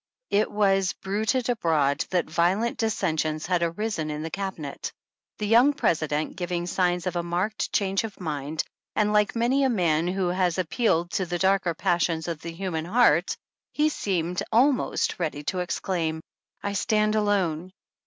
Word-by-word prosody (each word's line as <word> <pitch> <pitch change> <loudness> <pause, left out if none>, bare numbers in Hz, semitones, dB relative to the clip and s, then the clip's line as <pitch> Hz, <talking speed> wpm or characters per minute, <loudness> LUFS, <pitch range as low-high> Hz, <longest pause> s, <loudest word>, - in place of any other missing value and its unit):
It 210 +2 +3
was 195 -2 +2
bruited 220 +6 -1
abroad 160 - +1
that 180 -2 0
violent 180 +8 +1
dissensions 160 -8 0
had 175 0 +1
arisen 170 -1 -2
in 150 0 -4
the 165 - -5
Cabinet, 190 -8 -5 0.5
the 210 - -2
young 240 +7 +5
President 155 - 0
giving 175 -1 -2
signs 180 -1 0
of 180 -1 -2
a 175 - +1
marked 180 +6 -2
change 195 0 +1
of 220 -3 -7
mind, 155 -2 -3 0.3
and 210 0 +2
like 210 0 +2
many 245 +4 +2
a 265 - +3
^man 175 -6 +1
who 190 -1 0
has 180 -1 +1
appealed 175 -1 +1
to 190 -3 -1
the 175 +1 -2
darker 190 -2 +2
passions 165 -1 0
of 165 -2 -4
the 170 - -6
human 165 -2 -3
heart, 185 -4 +3 0.4
he 305 +1 +3
seemed 180 - -1
almost 250 -1 +2
ready 150 -4 -2
to 180 +5 -2
exclaim: 170 -3 -2 0.4
I 200 - -2
stand 215 +1 +1
alone. 190 -5 0
180 Hz, 160 wpm, -26 LUFS, 165-210 Hz, 0.5 s, young